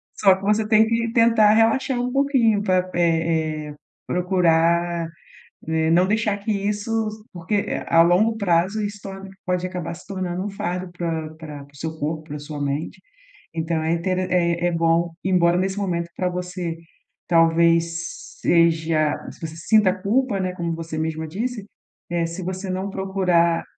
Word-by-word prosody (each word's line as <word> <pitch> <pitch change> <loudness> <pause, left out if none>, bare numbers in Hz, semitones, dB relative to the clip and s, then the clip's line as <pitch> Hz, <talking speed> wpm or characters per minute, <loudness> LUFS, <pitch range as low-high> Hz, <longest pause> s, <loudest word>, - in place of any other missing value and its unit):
Só 195 -2 +5
que 190 - -11
você 210 +2 +1
tem 220 0 +5
que 230 0 0
tentar 230 -2 +5
relaxar 245 +4 +2
um 250 0 -1
pouquinho 260 -7 +2
para, 185 -2 +1
é 160 -2 0
é, 145 - -9 0.3
procurar, 170 -1 +2 0.6
eh, 160 0 +1
não 180 +2 +4
deixar 210 0 +1
que 205 +2 -2
isso 205 +2 -2 0.4
porque, 180 +4 -3
eh, 200 - -2
a 165 - +5
longo 185 +7 +4
prazo 190 +2 +1
isso 205 0 -4
torna 195 -1 -8 0.2
pode 180 0 -1
acabar 180 -3 -5
se 175 - -12
tornando 185 -2 -3
um 205 - -3
fardo 180 -2 -4
para 165 -3 -3
para 150 -3 -9
para 140 - -23
o - - -19
seu 160 +2 -5
corpo, 155 +1 -2
para 150 -2 -7
sua 145 0 -7
mente, 140 +2 -3 0.6
então 160 0 -1
é 160 +1 0
intere 185 +2 0
é 170 -1 +1
é 175 - +1
bom, 165 0 +1
embora 175 -2 +3
nesse 190 +2 -1
momento 170 -4 -2
para 185 - 0
você 180 -1 -4 0.5
talvez 170 0 +2 0.2
seja 160 -2 +3 0.2
se - - -15
você 160 0 -10
sinta 200 +3 +3
culpa, 205 +3 0
né, 185 -1 -1
como 170 -2 -3
você 165 -1 -5
mesma 160 0 -2
disse, 215 +6 -4 0.5
eh, 170 -1 0
se 170 +3 -6
você 185 +2 -4
não 190 +2 -3
procurar, 180 -4 +1
180 Hz, 170 wpm, -22 LUFS, 165-200 Hz, 0.6 s, Só